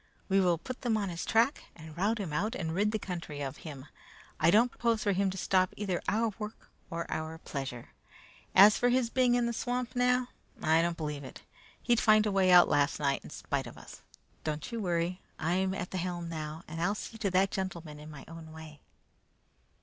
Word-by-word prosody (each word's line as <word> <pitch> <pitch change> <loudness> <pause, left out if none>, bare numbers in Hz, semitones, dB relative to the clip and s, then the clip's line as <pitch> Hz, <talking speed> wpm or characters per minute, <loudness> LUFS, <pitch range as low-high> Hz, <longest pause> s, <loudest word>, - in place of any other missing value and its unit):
We 195 0 +4
will 175 -3 +3
put 255 +9 -7
them 235 -4 +1
on 200 -3 -1
his 170 -1 -4
track, 235 +6 +2
and 160 -1 -11
rout 205 +6 +1
him 190 -8 -4
out 205 +9 -1
and 160 -3 -3
rid 205 +4 +2
the 220 - 0
country 170 -7 -6
of 135 -2 -4
him. 145 -4 -9 0.5
I 160 - +5
don't 230 +6 +5
propose 230 -2 0
for 205 - +2
him 195 +1 +1
to 190 - -5
stop 185 0 +2
either 195 -4 -2
our 220 0 +1
work 210 0 -8 0.2
or 170 -1 -3
our 160 +1 -3
pleasure. 135 -6 -6 0.7
As 210 +2 +8
for 245 - +3
his 245 -2 +2
being 250 -2 +3
in 245 -1 +2
the 235 - -1
swamp 245 +1 -2
now, 250 0 +2 0.3
I 160 +1 +4
don't 170 0 -1
believe 150 -2 -4
it. - - -10 0.4
He'd 240 -1 +3
find 215 -1 +5
a 210 - +1
way 190 -1 +3
out 180 -1 +8
last 145 0 +2
night, 140 -2 0
in - - -10
spite 140 -3 -3
of 120 - -11
us. - - -12 0.4
Don't 155 +7 -3
you 230 - -3
worry! 175 -1 -1 0.2
I 170 +2 0
am 190 0 0
at 180 - -5
the 185 - -2
helm 175 -1 -3
now, 155 0 -5
and 165 +1 -5
I'll 195 +4 +1
see 225 +1 -7
to 205 -3 0
that 190 +1 +2
gentleman 170 -6 -4
in 150 +1 -10
my 150 -3 -10
own 165 -1 -10
way." 155 -2 -11
185 Hz, 220 wpm, -31 LUFS, 160-215 Hz, 0.7 s, As